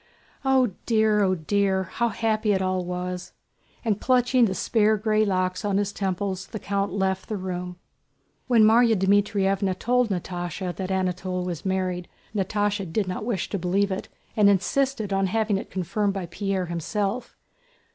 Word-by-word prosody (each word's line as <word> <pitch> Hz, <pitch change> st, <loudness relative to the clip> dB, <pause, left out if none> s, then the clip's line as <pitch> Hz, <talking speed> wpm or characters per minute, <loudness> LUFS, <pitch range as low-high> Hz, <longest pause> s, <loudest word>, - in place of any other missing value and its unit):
"Oh 260 Hz, -4 st, +3 dB, 0.2 s
dear! 220 Hz, -2 st, +3 dB
Oh 190 Hz, -2 st, +3 dB
dear! 190 Hz, +3 st, +1 dB
How 235 Hz, +6 st, -1 dB
happy 220 Hz, -1 st, +1 dB
it 190 Hz, -, +1 dB
all 185 Hz, -1 st, 0 dB
was!" 180 Hz, 0 st, -5 dB, 0.5 s
And 210 Hz, -3 st, 0 dB
clutching 250 Hz, -1 st, +4 dB
the 190 Hz, -3 st, -1 dB
spare 215 Hz, +3 st, +2 dB
gray 215 Hz, +1 st, +2 dB
locks 185 Hz, -2 st, 0 dB
on 200 Hz, -2 st, +1 dB
his 205 Hz, 0 st, -1 dB
temples 190 Hz, -1 st, -2 dB
the 220 Hz, -, -6 dB
count 200 Hz, -1 st, -1 dB
left 190 Hz, -1 st, -1 dB
the 215 Hz, -, -2 dB
room. 180 Hz, -1 st, -5 dB, 0.7 s
When 235 Hz, -3 st, +5 dB
Márya 225 Hz, +1 st, +5 dB
Dmítrievna 195 Hz, -1 st, +2 dB
told 250 Hz, +1 st, +2 dB
Natásha 180 Hz, -1 st, -3 dB
that 190 Hz, -1 st, -4 dB
Anatole 185 Hz, -1 st, -1 dB
was 175 Hz, -2 st, -5 dB
married, 185 Hz, -2 st, -1 dB, 0.3 s
Natásha 205 Hz, -2 st, -1 dB
did 200 Hz, +2 st, 0 dB
not 185 Hz, +3 st, -4 dB
wish 215 Hz, -7 st, -1 dB
to 200 Hz, -, -2 dB
believe 195 Hz, +3 st, +1 dB
it 190 Hz, -, -4 dB, 0.3 s
and 210 Hz, -2 st, +5 dB
insisted 215 Hz, +2 st, +1 dB
on 195 Hz, 0 st, +2 dB
having 210 Hz, 0 st, +1 dB
it -, -, -8 dB
confirmed 195 Hz, +2 st, -1 dB
by 190 Hz, -2 st, -3 dB
Pierre 190 Hz, +1 st, -2 dB
himself. 200 Hz, +7 st, -3 dB
195 Hz, 160 wpm, -25 LUFS, 185-215 Hz, 0.7 s, When